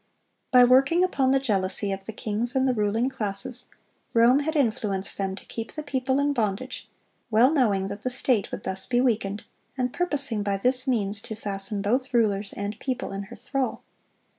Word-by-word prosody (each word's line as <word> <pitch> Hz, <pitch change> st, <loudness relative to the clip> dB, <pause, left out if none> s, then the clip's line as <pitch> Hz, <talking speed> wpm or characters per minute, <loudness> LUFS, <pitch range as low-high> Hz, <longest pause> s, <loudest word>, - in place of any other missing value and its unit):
By 250 Hz, -2 st, +7 dB
working 270 Hz, +8 st, +5 dB
upon 275 Hz, -8 st, +1 dB
the 270 Hz, 0 st, +4 dB
jealousy 200 Hz, -4 st, +1 dB
of 195 Hz, 0 st, -5 dB
the 220 Hz, -, -5 dB
kings 220 Hz, +4 st, -2 dB
and 265 Hz, 0 st, +2 dB
the 255 Hz, -, +2 dB
ruling 220 Hz, +2 st, 0 dB
classes, 250 Hz, 0 st, -2 dB, 0.5 s
Rome 235 Hz, +4 st, +5 dB
had 315 Hz, +2 st, -2 dB
influenced 215 Hz, -8 st, 0 dB
them 195 Hz, -1 st, -1 dB
to -, -, -12 dB
keep 225 Hz, -1 st, -6 dB
the 305 Hz, -, -5 dB
people 260 Hz, -2 st, -1 dB
in 285 Hz, 0 st, +1 dB
bondage, 225 Hz, +1 st, -3 dB, 0.4 s
well 235 Hz, +5 st, +5 dB
knowing 210 Hz, -10 st, +2 dB
that 200 Hz, +1 st, -7 dB
the 255 Hz, -, -2 dB
state 250 Hz, -4 st, +1 dB
would -, -, -6 dB
thus 190 Hz, 0 st, -1 dB
be 245 Hz, -1 st, +1 dB
weakened, 220 Hz, -4 st, 0 dB, 0.3 s
and 250 Hz, -1 st, -1 dB
purposing 280 Hz, -11 st, +1 dB
by 200 Hz, -1 st, -1 dB
this 255 Hz, +5 st, +2 dB
means 205 Hz, -5 st, 0 dB
to 220 Hz, -, -7 dB
fasten 200 Hz, -1 st, -2 dB
both 255 Hz, +4 st, 0 dB
rulers 205 Hz, -3 st, +1 dB
and 205 Hz, +2 st, -5 dB
people 260 Hz, -6 st, -3 dB
in 195 Hz, 0 st, -5 dB
her 240 Hz, -, -9 dB
thrall. 270 Hz, -2 st, -3 dB
235 Hz, 190 wpm, -25 LUFS, 200-260 Hz, 0.5 s, By